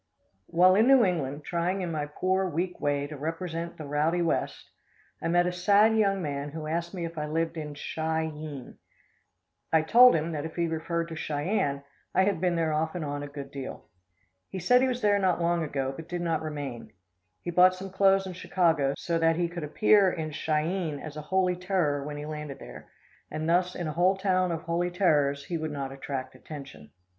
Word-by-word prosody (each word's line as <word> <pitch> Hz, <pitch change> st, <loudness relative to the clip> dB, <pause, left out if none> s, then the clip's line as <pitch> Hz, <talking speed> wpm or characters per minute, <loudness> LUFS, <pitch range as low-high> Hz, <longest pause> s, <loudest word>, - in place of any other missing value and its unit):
While 180 Hz, +2 st, +5 dB
in 215 Hz, +5 st, +4 dB
New 270 Hz, -2 st, +7 dB
England 150 Hz, -5 st, -2 dB
trying 180 Hz, +3 st, -1 dB
in 175 Hz, -2 st, -3 dB
my 150 Hz, -2 st, -2 dB
poor, 185 Hz, +5 st, 0 dB
weak 175 Hz, +2 st, -3 dB
way 145 Hz, -1 st, 0 dB
to 150 Hz, +1 st, -7 dB
represent 165 Hz, +3 st, -4 dB
the 155 Hz, -, -7 dB
"rowdy 155 Hz, +4 st, +1 dB
west," 165 Hz, -, -2 dB, 0.5 s
I -, -, -1 dB
met 175 Hz, +1 st, +3 dB
a 180 Hz, -, 0 dB
sad 205 Hz, +5 st, +4 dB
young 195 Hz, -3 st, +2 dB
man 140 Hz, -1 st, -3 dB
who 155 Hz, +1 st, -6 dB
asked 170 Hz, +3 st, -3 dB
me 175 Hz, -2 st, -3 dB
if 165 Hz, -1 st, -6 dB
I 150 Hz, -, -2 dB
lived 165 Hz, +2 st, -1 dB
in 150 Hz, -2 st, -6 dB
Chi 160 Hz, +2 st, -2 dB
eene. 150 Hz, -4 st, -8 dB, 0.9 s
I 160 Hz, -1 st, +4 dB
told 245 Hz, +8 st, +7 dB
him 160 Hz, +1 st, -1 dB
that 150 Hz, -2 st, -3 dB
if 160 Hz, 0 st, -7 dB
he 170 Hz, -, +1 dB
referred 165 Hz, +1 st, -2 dB
to 165 Hz, -, -6 dB
Cheyenne, 145 Hz, -2 st, -1 dB, 0.3 s
I 190 Hz, -, +5 dB
had 190 Hz, -4 st, 0 dB
been 180 Hz, -2 st, +2 dB
there 160 Hz, -2 st, 0 dB
off 160 Hz, +2 st, -1 dB
and 170 Hz, -3 st, -3 dB
on 145 Hz, 0 st, -3 dB
a 145 Hz, -, -5 dB
good 140 Hz, -1 st, -8 dB
deal. 135 Hz, -2 st, -7 dB, 0.6 s
He -, -, -6 dB
said 250 Hz, +8 st, +4 dB
he 260 Hz, -, +3 dB
was 250 Hz, -2 st, -3 dB
there 205 Hz, -1 st, +4 dB
not 185 Hz, -3 st, +2 dB
long 170 Hz, 0 st, +1 dB
ago, 135 Hz, -3 st, -2 dB
but 160 Hz, +3 st, -10 dB
did 175 Hz, 0 st, -3 dB
not 165 Hz, -2 st, 0 dB
remain. 145 Hz, -6 st, -6 dB, 0.5 s
He 175 Hz, -, -3 dB
bought 180 Hz, +2 st, +6 dB
some 190 Hz, +1 st, -8 dB
clothes 195 Hz, 0 st, +3 dB
in 185 Hz, -, -6 dB
Chicago, 165 Hz, -6 st, +1 dB
so 170 Hz, -1 st, -1 dB
that 165 Hz, 0 st, +3 dB
he 175 Hz, +1 st, 0 dB
could 170 Hz, -1 st, -6 dB
appear 195 Hz, +5 st, +4 dB
in 160 Hz, -3 st, -4 dB
Chi 150 Hz, 0 st, 0 dB
eene 170 Hz, -4 st, -2 dB
as 155 Hz, 0 st, -8 dB
a 150 Hz, -, -5 dB
"holy 180 Hz, +3 st, +1 dB
terror" 175 Hz, -6 st, 0 dB
when 145 Hz, +1 st, -6 dB
he 145 Hz, -, -6 dB
landed 150 Hz, -2 st, -6 dB
there, -, -, -11 dB, 0.4 s
and 155 Hz, +1 st, -3 dB
thus 180 Hz, +2 st, +2 dB
in 175 Hz, -, -3 dB
a 155 Hz, -, -3 dB
whole 185 Hz, +4 st, +3 dB
town 185 Hz, -2 st, +1 dB
of 165 Hz, -1 st, -3 dB
"holy 170 Hz, +1 st, 0 dB
terrors" 145 Hz, -6 st, +2 dB
he 170 Hz, -2 st, -3 dB
would 155 Hz, 0 st, -3 dB
not 140 Hz, -2 st, -4 dB
attract 135 Hz, -1 st, -5 dB
attention. 140 Hz, -, -10 dB
165 Hz, 215 wpm, -28 LUFS, 150-180 Hz, 0.9 s, New